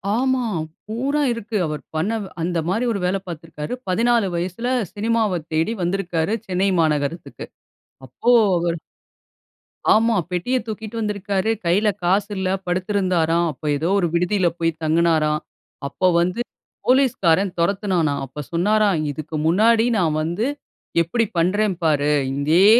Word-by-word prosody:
ஆமா. 260 +1 +1 0.4
பூரா 270 +7 -1
இருக்கு. 230 -1 -6
அவர் 150 0 -4
பண்ண, 165 +8 0 0.3
அந்தமாரி 175 +6 0
1 200 - -2
வேல 190 +2 +1
பாத்திருக்காரு. 165 +1 -6 0.2
14 230 +2 +2
வயசுல 180 +7 -3 0.3
சினிமாவத் 210 -6 0
தேடி 160 +8 +1
வந்திருக்காரு 175 +1 0
சென்னை 190 +1 +1
மாநகரத்துக்கு 150 +1 -2 0.6
அப்போ 185 - 0 0.3
அவரு. 170 0 -1 1.2
ஆமா, 225 +1 +3 0.2
பெட்டிய 180 +9 0
தூக்கிட்டு 220 +1 -6
வந்திருக்காரு. 205 -1 -1 0.2
கையில 200 +6 +3
காசு 195 +4 +2
இல்ல. 185 -1 -1 0.2
படுத்திருந்தாராம். 180 -3 +1
அப்போ 150 +2 -12
ஏதோ 160 +4 -1
1 175 - +1
விடுதியில 180 +2 +2
போயி 165 0 +2
தங்குனாராம். 155 -1 +2 0.5
அப்போ 185 +6 0
வந்து 180 +6 -1 0.5
போலீஸ்காரன் 205 -9 +3
தொரத்துனானாம். 175 -5 +1
அப்போ 135 +3 -10
சொன்னாராம், 200 +1 +2
"இதுக்கு 155 +2 -7
முன்னாடி 225 +6 +4
நான் 165 -5 +2
வந்து 170 +8 -1 0.6
எப்பிடி 225 +8 0
பண்றேன் 195 +3 +2
பாரு." 150 -2 +2 0.2
இதே, 155 +7 +4
180 Hz, 120 wpm, -21 LUFS, 165-215 Hz, 1.2 s, முன்னாடி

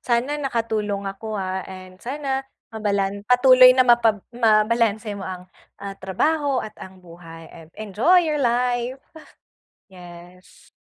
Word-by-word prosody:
sana 250 +4 -1
nakatulong 220 -6 -2
ako, 205 +3 -6
ah, 190 -1 -3
and 185 0 -12
sana 270 +1 -4 0.3
mabalan 200 -2 -2
patuloy 255 +1 +7
na 255 - +5
mapab 230 -4 +3
mabalanse 220 -1 +1
mo 195 - -7
ang, 180 -1 -7 0.4
ah, 200 -1 -7
trabaho 280 - -1
at 215 0 -9
ang 185 0 -12
buhay 165 -1 -13
and 165 -1 -15
enjoy 215 - +2
your 305 -2 -1
life. 245 0 0 1.0
Yes. 180 0 -15
215 Hz, 125 wpm, -22 LUFS, 190-250 Hz, 1.0 s, patuloy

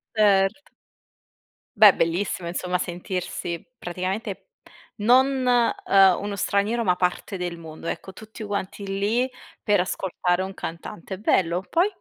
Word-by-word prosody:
Ert 200 -1 +4 1.2
Beh, 210 -1 +10
bellissimo, 170 +1 -1
insomma, 180 +1 -1
sentirsi 175 -1 -4
praticamente 190 - -4 0.5
non, 255 +4 +3 0.4
ehm, 195 -2 +6
uno 205 0 -4
straniero, 205 +4 0
ma 180 -4 +2
parte 180 +2 -1
del 175 -2 -4
mondo. 160 0 -9
Ecco, 190 - -5
tutti 220 +1 -10
quanti 200 -1 -4
lì, 205 +6 0 0.4
per 205 -3 +3
ascoltare 180 0 -1
un 190 0 -6
cantante, 170 +3 -7
è - - -12
bello. 180 -3 +1
Poi? 350 +4 +3
195 Hz, 125 wpm, -24 LUFS, 180-210 Hz, 1.2 s, Beh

